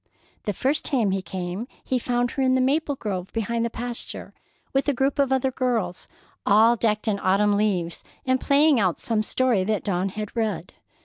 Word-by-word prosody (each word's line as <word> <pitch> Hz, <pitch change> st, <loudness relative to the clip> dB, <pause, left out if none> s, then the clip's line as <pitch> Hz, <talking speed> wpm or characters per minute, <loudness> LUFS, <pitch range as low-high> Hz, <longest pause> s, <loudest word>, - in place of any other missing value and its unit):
The 205 Hz, -, 0 dB
first 275 Hz, -, 0 dB
time 235 Hz, -9 st, +1 dB
he 190 Hz, 0 st, 0 dB
came, 185 Hz, +4 st, -5 dB, 0.2 s
he 255 Hz, -, 0 dB
found 245 Hz, 0 st, 0 dB
her 275 Hz, -, -2 dB
in 260 Hz, -1 st, +3 dB
the -, -, +3 dB
maple 285 Hz, +3 st, +1 dB
grove 195 Hz, -6 st, -4 dB
behind 230 Hz, +1 st, -1 dB
the 235 Hz, -, 0 dB
pasture, 240 Hz, +1 st, -5 dB, 0.4 s
with 270 Hz, +2 st, +2 dB
a -, -, +2 dB
group 270 Hz, +3 st, 0 dB
of 275 Hz, -2 st, +3 dB
other 265 Hz, 0 st, +2 dB
girls, 230 Hz, -9 st, -1 dB, 0.4 s
all 220 Hz, +3 st, +5 dB
decked 215 Hz, -1 st, 0 dB
in 205 Hz, -2 st, +1 dB
autumn 200 Hz, +2 st, +3 dB
leaves 185 Hz, -5 st, 0 dB, 0.2 s
and 260 Hz, 0 st, +1 dB
playing 285 Hz, -1 st, +4 dB
out 185 Hz, -5 st, +1 dB
some 225 Hz, -2 st, 0 dB
story 235 Hz, -2 st, +1 dB
that 215 Hz, 0 st, 0 dB
Dawn 190 Hz, -1 st, 0 dB
had 210 Hz, +3 st, -6 dB
read. 220 Hz, -2 st, -2 dB
230 Hz, 190 wpm, -24 LUFS, 200-260 Hz, 0.4 s, all